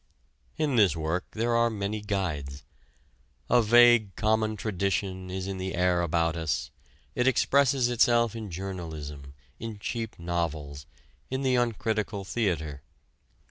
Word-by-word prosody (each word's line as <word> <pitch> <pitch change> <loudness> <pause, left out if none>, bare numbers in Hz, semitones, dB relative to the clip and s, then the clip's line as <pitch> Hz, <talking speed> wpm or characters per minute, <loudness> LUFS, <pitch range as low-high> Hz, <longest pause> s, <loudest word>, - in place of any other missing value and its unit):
In 150 -5 +1
this 100 -7 +5
work 80 +3 -2
there 115 +2 0
are 115 0 +3
many 105 -1 -3
guides. 75 -9 -3 0.9
A 120 0 +6
vague 120 -2 +5
common 110 0 +1
tradition 95 -2 -2
is 95 0 -4
in 95 -1 -4
the 95 0 -3
air 90 0 +2
about 85 -1 +1
us 80 -5 -2 0.4
it 125 +6 +1
expresses 130 0 +3
itself 120 -1 +3
in 110 -3 -6
journalism, 80 -7 -7 0.2
in 115 -2 -6
cheap 115 +2 -4
novels, 80 -5 -3 0.4
in 130 +1 -2
the 130 -1 +2
uncritical 110 -4 -1
theater. 85 - -2
100 Hz, 130 wpm, -28 LUFS, 85-115 Hz, 0.9 s, A